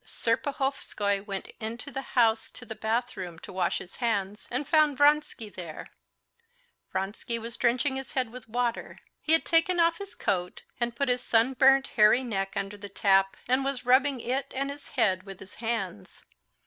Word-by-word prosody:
Serpuhovskoy 230 Hz, -5 st, -1 dB
went 195 Hz, -1 st, -5 dB
into 230 Hz, +5 st, -6 dB
the 270 Hz, -, -3 dB, 0.2 s
house 225 Hz, -2 st, +4 dB
to -, -, -11 dB
the -, -, -6 dB
bathroom 220 Hz, -6 st, -2 dB
to -, -, -11 dB
wash 185 Hz, -2 st, 0 dB
his 180 Hz, -, -10 dB
hands 210 Hz, -4 st, -1 dB
and 260 Hz, +4 st, -2 dB
found 305 Hz, -4 st, +4 dB
Vronsky 290 Hz, -6 st, +3 dB
there; 175 Hz, -6 st, -8 dB, 1.1 s
Vronsky 195 Hz, +5 st, -3 dB
was 230 Hz, 0 st, -7 dB
drenching 255 Hz, +3 st, +1 dB
his 265 Hz, -2 st, -7 dB
head 255 Hz, -4 st, -1 dB
with 240 Hz, -2 st, -11 dB
water. 240 Hz, 0 st, -2 dB, 0.2 s
He 315 Hz, -, +1 dB
had 325 Hz, -, +4 dB
taken 345 Hz, +2 st, +3 dB
off 335 Hz, 0 st, +3 dB
his 400 Hz, 0 st, -8 dB
coat 180 Hz, -2 st, -2 dB, 0.2 s
and 240 Hz, -1 st, -1 dB
put 280 Hz, +3 st, 0 dB
his 250 Hz, 0 st, +1 dB
sunburnt, 265 Hz, +4 st, +4 dB
hairy 220 Hz, +3 st, +4 dB
neck 195 Hz, -5 st, -2 dB
under 200 Hz, +1 st, -3 dB
the 205 Hz, 0 st, -9 dB
tap, 195 Hz, -1 st, +3 dB
and 255 Hz, +2 st, +2 dB
was 275 Hz, -2 st, -2 dB
rubbing 265 Hz, +1 st, +4 dB
it 260 Hz, +3 st, -2 dB
and 275 Hz, +1 st, -1 dB
his 285 Hz, 0 st, -10 dB
head 190 Hz, -6 st, +3 dB
with 195 Hz, -1 st, -10 dB
his 195 Hz, -, -12 dB
hands. 210 Hz, -, -4 dB
235 Hz, 175 wpm, -28 LUFS, 200-270 Hz, 1.1 s, house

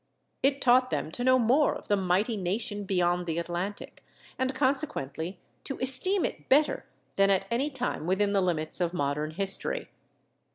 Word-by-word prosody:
It 275 Hz, +1 st, +1 dB
taught 255 Hz, +1 st, +4 dB
them 155 Hz, -, -3 dB
to 245 Hz, -, -4 dB
know 255 Hz, 0 st, +5 dB
more 255 Hz, +5 st, +2 dB
of -, -, -10 dB
the 205 Hz, -, +2 dB
mighty 195 Hz, +4 st, 0 dB
nation 205 Hz, +2 st, -3 dB
beyond 180 Hz, -2 st, 0 dB
the 165 Hz, 0 st, -2 dB
Atlantic, 175 Hz, +4 st, -5 dB, 0.4 s
and 260 Hz, 0 st, -1 dB
consequently 200 Hz, -, -2 dB, 0.3 s
to 275 Hz, -, -4 dB
esteem 270 Hz, +10 st, +4 dB
it -, -, -7 dB
better 295 Hz, +3 st, +2 dB, 0.3 s
than 195 Hz, 0 st, +4 dB
at 195 Hz, 0 st, +2 dB
any 265 Hz, +5 st, 0 dB
time 250 Hz, -, -4 dB
within 200 Hz, +2 st, +1 dB
the 195 Hz, -, +2 dB
limits 170 Hz, -2 st, -1 dB
of 175 Hz, 0 st, -1 dB
modern 145 Hz, 0 st, -1 dB
history. 195 Hz, +4 st, -1 dB
200 Hz, 165 wpm, -28 LUFS, 175-255 Hz, 0.4 s, know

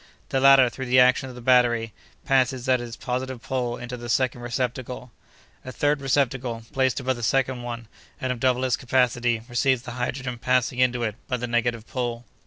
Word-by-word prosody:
"The 135 Hz, -, +1 dB
latter, 135 Hz, -1 st, +7 dB
through 130 Hz, +2 st, -6 dB
the 130 Hz, +1 st, +5 dB
action 125 Hz, +1 st, +4 dB
of 125 Hz, -, -10 dB
the 125 Hz, -, -10 dB
battery, 120 Hz, -3 st, +3 dB, 0.3 s
passes 130 Hz, -1 st, +1 dB
at 130 Hz, -1 st, +3 dB
its 120 Hz, -1 st, -7 dB
positive 130 Hz, 0 st, -3 dB
pole 120 Hz, -1 st, -3 dB
into 125 Hz, 0 st, -6 dB
the 120 Hz, 0 st, -8 dB
second 125 Hz, 0 st, +1 dB
receptacle. 125 Hz, 0 st, -4 dB, 0.5 s
A 130 Hz, -, -7 dB
third 145 Hz, +1 st, 0 dB
receptacle, 130 Hz, -3 st, 0 dB
placed 130 Hz, -1 st, +1 dB
above 130 Hz, -1 st, -1 dB
the -, -, -7 dB
second 130 Hz, +1 st, 0 dB
one, 120 Hz, -1 st, -6 dB, 0.3 s
and 130 Hz, -, -2 dB
of 125 Hz, -, -4 dB
double 130 Hz, 0 st, +1 dB
its 130 Hz, -2 st, +2 dB
capacity, 120 Hz, -2 st, +1 dB
receives 130 Hz, 0 st, +1 dB
the 120 Hz, -, -7 dB
hydrogen 125 Hz, 0 st, -4 dB
passing 125 Hz, 0 st, +1 dB
into 125 Hz, -1 st, +2 dB
it 110 Hz, -1 st, -2 dB
by 125 Hz, -, -1 dB
the 125 Hz, -, -3 dB
negative 120 Hz, -1 st, -1 dB
pole. 120 Hz, -2 st, -3 dB
125 Hz, 195 wpm, -24 LUFS, 120-130 Hz, 0.5 s, latter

